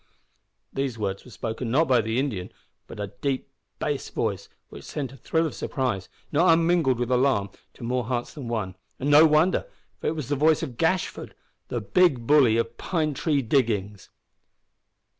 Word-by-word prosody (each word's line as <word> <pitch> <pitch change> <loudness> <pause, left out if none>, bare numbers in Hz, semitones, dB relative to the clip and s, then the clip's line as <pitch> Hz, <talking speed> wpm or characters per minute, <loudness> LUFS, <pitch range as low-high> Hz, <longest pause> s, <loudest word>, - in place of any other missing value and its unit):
These 135 -3 -2
words 100 -2 -3
were - - -14
spoken, 115 +1 -4
not 150 +7 +3
by 125 -3 +4
the 110 +2 -2
Indian, 120 -10 -2 0.4
but - - -10
by 105 - -3
a - - -3
deep 135 -2 -2 0.3
bass - - -2
voice - - -2 0.2
which - - -11
sent 135 -4 -4
a - - -12
thrill 160 +6 0
of 160 - -3
surprise, 115 -9 -2 0.2
not 165 +4 +4
unmingled 165 -5 +3
with 120 +1 -2
alarm, 125 -6 +2 0.2
to - - -11
more 125 0 -1
hearts 120 0 -3
than 140 -6 -7
one; 105 -5 -3 0.2
and 140 +3 -1
no 155 +2 +8
wonder, 160 - +3 0.3
for - - -3
it 160 - 0
was 150 -5 -5
the 145 - +1
voice 155 +3 +3
of 130 -7 -6
Gashford, 170 +3 -1 0.3
the - - -3
big 175 - +3
bully 130 -5 +5
of 115 0 -2
Pine 155 -4 -1
Tree 140 0 0
Diggings! 105 -6 0
130 Hz, 180 wpm, -25 LUFS, 115-155 Hz, 0.4 s, no